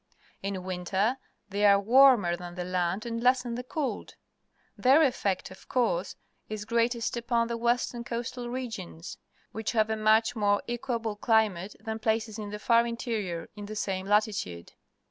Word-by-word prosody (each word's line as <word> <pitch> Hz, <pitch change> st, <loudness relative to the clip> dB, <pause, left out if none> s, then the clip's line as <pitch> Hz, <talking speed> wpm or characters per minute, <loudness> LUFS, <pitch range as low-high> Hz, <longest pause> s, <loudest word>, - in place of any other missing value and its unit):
In 195 Hz, -1 st, -4 dB
winter 190 Hz, +7 st, -1 dB, 0.3 s
they 200 Hz, +1 st, -1 dB
are 200 Hz, -1 st, +7 dB
warmer 235 Hz, -5 st, +5 dB
than 175 Hz, 0 st, -9 dB
the 180 Hz, -, -3 dB
land 180 Hz, +3 st, -1 dB
and 230 Hz, -1 st, -3 dB
lessen 250 Hz, -1 st, +2 dB
the 245 Hz, -, -3 dB
cold. 255 Hz, -4 st, -4 dB, 0.6 s
Their 270 Hz, +5 st, +5 dB
effect, 200 Hz, -10 st, 0 dB
of 185 Hz, -, -15 dB
course, 205 Hz, -8 st, 0 dB, 0.3 s
is 215 Hz, -1 st, -5 dB
greatest 235 Hz, +1 st, 0 dB
upon 235 Hz, 0 st, 0 dB
the 235 Hz, -, -1 dB
western 240 Hz, 0 st, 0 dB
coastal 240 Hz, +1 st, -4 dB
regions, 225 Hz, -9 st, -6 dB, 0.3 s
which 220 Hz, +1 st, -3 dB
have 220 Hz, -1 st, +2 dB
a -, -, +1 dB
much 220 Hz, +2 st, +3 dB
more 205 Hz, -2 st, +2 dB
equable 235 Hz, -2 st, -2 dB
climate 210 Hz, -4 st, +1 dB
than 220 Hz, 0 st, -5 dB
places 220 Hz, 0 st, -1 dB
in 210 Hz, -1 st, -5 dB
the 210 Hz, -, -5 dB
far 235 Hz, +2 st, +3 dB
interior 215 Hz, -8 st, -3 dB
in 205 Hz, -1 st, -8 dB
the 215 Hz, -, -6 dB
same 190 Hz, -2 st, -2 dB
latitude. 205 Hz, -, 0 dB
220 Hz, 160 wpm, -28 LUFS, 200-235 Hz, 0.6 s, are